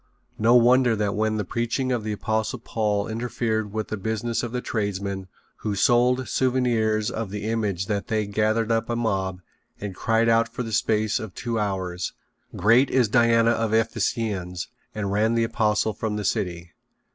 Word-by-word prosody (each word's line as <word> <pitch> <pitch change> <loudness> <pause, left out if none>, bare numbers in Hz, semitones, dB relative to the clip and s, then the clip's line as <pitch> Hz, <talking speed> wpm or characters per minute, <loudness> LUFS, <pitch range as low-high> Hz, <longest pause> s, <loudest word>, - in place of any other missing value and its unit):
No 115 +3 +5
wonder 125 0 +5
that 105 -1 0
when 110 +1 0
the 105 - -2
preaching 120 +6 -1
of 120 -3 0
the 110 - -3
Apostle 110 +4 -1
Paul 105 -3 -1
interfered 110 -2 -2
with 110 0 -3
the 110 - -3
business 110 +3 -2
of 120 - -4
the 125 - -2
tradesmen 100 -4 -3 0.3
who 105 -2 -3
sold 125 +4 +3
souvenirs 115 -5 +1
of 110 -3 -4
the 105 +1 -5
image 105 -5 -1
that 100 0 -2
they 110 -1 0
gathered 110 +2 0
up 115 +1 0
a 120 - 0
mob 95 -5 -1 0.4
and 100 -2 -5
cried 115 +4 +1
out 115 0 +3
for 125 - -4
the 115 -1 -6
space 110 -1 +1
of 110 -4 -8
two 115 -2 -2
hours: 95 -3 -2 0.4
"Great 115 +7 +4
is 125 -4 +2
Diana 115 0 +4
of 115 -1 0
the 110 +1 +4
Ephesians," 105 -6 -2 0.3
and 100 -2 -2
ran 110 +3 +2
the 115 - +2
apostle 110 -1 +1
from 110 0 -3
the 105 -1 -3
city. 90 -5 -2
110 Hz, 180 wpm, -24 LUFS, 105-115 Hz, 0.4 s, No